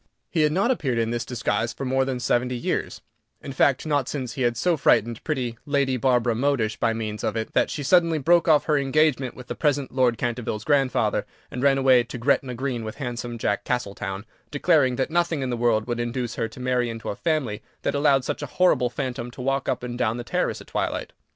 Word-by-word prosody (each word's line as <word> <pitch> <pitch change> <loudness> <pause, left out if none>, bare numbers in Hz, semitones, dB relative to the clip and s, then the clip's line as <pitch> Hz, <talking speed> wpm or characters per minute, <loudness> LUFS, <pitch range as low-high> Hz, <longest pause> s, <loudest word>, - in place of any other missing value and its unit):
"] - - -52
He 165 - +1
had 150 0 +3
not 195 +9 +2
appeared 135 - -1
in 115 0 0
this 120 0 -1
disguise 120 -1 -1
for 135 - -5
more 130 +1 +1
than 130 -2 -2
seventy 125 +1 0
years; 120 - -3 0.4
in 140 - -8
fact, 135 +1 +2
not 145 -4 0
since 130 -5 -4
he 130 - -5
had 120 -1 +1
so 175 +7 +2
frightened 115 -5 +2
pretty 125 -7 -2
Lady 140 -2 +1
Barbara 125 -1 +2
Modish 120 -3 0
by 115 - +1
means 110 -2 -4
of - - -1
it, 110 -1 -3
that - - +2
she 145 - -4
suddenly 165 +2 +4
broke 170 +4 +3
off 155 -2 +4
her 150 -2 +2
engagement 140 -2 +1
with 125 - -10
the - - -4
present 145 -3 0
Lord 125 -3 +2
Canterville's 120 -3 -3
grandfather, 135 -2 +1 0.2
and 125 - -4
ran 140 0 +4
away 130 -2 +5
to 125 - -7
Gretna 125 0 +1
Green 125 -2 -3
with 110 0 -6
handsome 120 -3 -5
Jack 105 -2 -1
Castletown, 100 -4 -3 0.2
declaring 145 -4 +3
that 130 +4 -1
nothing 170 -4 +1
in 130 - -2
the - - 0
world 115 -2 +1
would 120 -1 -3
induce 120 0 -2
her 115 - -2
to 115 - -13
marry 125 -1 0
into 115 -1 -6
a - - -3
family 140 -10 -1 0.2
that - - 0
allowed 140 -2 +3
such - - -3
a - - -4
horrible 180 -9 +2
phantom 125 -1 -4
to 120 - -14
walk 135 +1 -1
up 125 - -1
and 120 0 -5
down 120 -2 +1
the 120 - -5
terrace - - -1
at - - -12
twilight. - - -3
125 Hz, 230 wpm, -24 LUFS, 120-140 Hz, 0.4 s, away